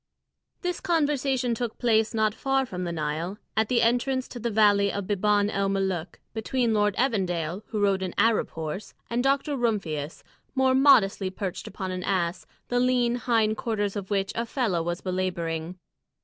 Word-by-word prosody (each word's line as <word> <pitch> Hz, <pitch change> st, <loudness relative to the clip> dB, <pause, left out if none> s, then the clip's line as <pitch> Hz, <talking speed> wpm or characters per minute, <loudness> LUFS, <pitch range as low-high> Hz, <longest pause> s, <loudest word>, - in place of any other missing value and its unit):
This 355 Hz, -1 st, -1 dB
conversation 285 Hz, -8 st, +1 dB
took 230 Hz, -1 st, -3 dB
place 225 Hz, -2 st, +2 dB
not 220 Hz, -2 st, +1 dB
far 270 Hz, +2 st, 0 dB
from 180 Hz, -6 st, -5 dB
the 170 Hz, -, -2 dB
Nile, 160 Hz, +4 st, -3 dB, 0.2 s
at 220 Hz, 0 st, +1 dB
the 245 Hz, -, +3 dB
entrance 250 Hz, +3 st, +1 dB
to 245 Hz, -, -7 dB
the 235 Hz, +1 st, -1 dB
valley 205 Hz, -2 st, +4 dB
of 200 Hz, -1 st, -3 dB
Biban 205 Hz, +1 st, +2 dB
el 195 Hz, 0 st, 0 dB
Molûk, 190 Hz, -3 st, -1 dB, 0.2 s
between 230 Hz, +1 st, 0 dB
Lord 210 Hz, -2 st, +2 dB
Evandale, 185 Hz, -, 0 dB
who 220 Hz, -, -3 dB
rode 200 Hz, -2 st, +2 dB
an 185 Hz, -2 st, -4 dB
Arab 225 Hz, -1 st, +3 dB
horse, 160 Hz, +5 st, -6 dB, 0.2 s
and 240 Hz, +1 st, +1 dB
Dr. 275 Hz, +2 st, +1 dB
Rumphius, 180 Hz, -, -2 dB, 0.3 s
more 260 Hz, -1 st, +3 dB
modestly 220 Hz, -8 st, +5 dB
perched 185 Hz, -1 st, -5 dB
upon 190 Hz, -1 st, -5 dB
an 185 Hz, 0 st, -3 dB
ass, 180 Hz, -2 st, -1 dB, 0.2 s
the 245 Hz, -, +1 dB
lean 245 Hz, -1 st, +2 dB
hind 225 Hz, -3 st, +1 dB
quarters 205 Hz, -3 st, -1 dB
of 200 Hz, -2 st, -5 dB
which 195 Hz, -1 st, 0 dB
a 230 Hz, 0 st, -2 dB
fellah 225 Hz, -9 st, 0 dB
was 175 Hz, +1 st, -3 dB
belabouring. 175 Hz, -2 st, -2 dB
210 Hz, 170 wpm, -26 LUFS, 185-245 Hz, 0.3 s, modestly